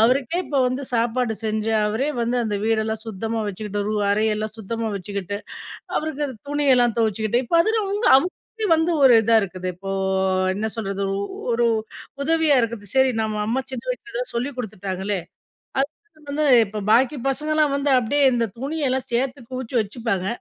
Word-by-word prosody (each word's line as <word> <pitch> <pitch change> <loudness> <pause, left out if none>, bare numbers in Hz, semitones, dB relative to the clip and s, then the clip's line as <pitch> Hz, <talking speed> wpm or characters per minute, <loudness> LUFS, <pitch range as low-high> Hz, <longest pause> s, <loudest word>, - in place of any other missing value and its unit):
அவருக்கே 255 +7 +3
இப்ப 285 - -1
வந்து 255 +2 -2
சாப்பாடு 235 0 +1
செஞ்சு 220 0 -1 0.2
அவரே 225 +7 0
வந்து 235 +2 0
அந்த 210 -2 -1
வீடெல்லாம் 220 -1 0
சுத்தமா 225 +2 -3
வச்சுக்கிட்டு 205 +1 -4
ரூ 215 - -1 0.2
அறை 215 +2 +2
எல்லாம் 215 0 -3
சுத்தமா 225 +1 -3
வச்சுக்கிட்டு 200 0 -4 0.6
அவருக்கு 300 -1 -2
அது 260 - -7 0.2
துணியெல்லாம் 260 -5 +3
துவச்சுக்குட்டு 220 +2 +1
இப்ப 335 +8 +1
அதில 440 +3 +1
அவங்க 405 +3 -1
அவங்க 345 +7 +2 0.5
வந்து 325 +2 +1
ஒரு 260 -2 +8
இதா 225 +1 +4
இருக்குது. 185 -2 -4
இப்போ 195 +2 -7 0.6
என்ன 215 +3 -2
சொல்றது, 200 -2 -3 0.2
ஒ - - -2 0.3
ஒரு 235 +1 +2 0.6
உதவியா 315 -1 +3
இருக்குது 230 -3 -3
சரி 265 0 +5
நம்ம 215 -1 -2
அம்மா 250 +4 0
சின்ன 255 -3 -5
வயசுல 425 -4 -6
எதோ - - -1
சொல்லிக் 255 +3 -2
குடுத்துட்டாங்களே! 195 -3 -3 0.6
அது 275 - +1 0.4
வந்து 300 +2 0 0.2
இப்ப 210 +1 -5
பாக்கி 260 +5 +4
பசங்கலாம் 300 +1 +1
வந்து 280 0 0
அப்டியே 280 +4 +2
இந்த 235 -1 +1
துணியெல்லாம் 270 -1 -1
சேர்த்து 255 +3 0
குவிச்சி 255 -1 -4
வச்சுப்பாங்க. 210 -3 -2
235 Hz, 160 wpm, -23 LUFS, 215-275 Hz, 0.6 s, ஒரு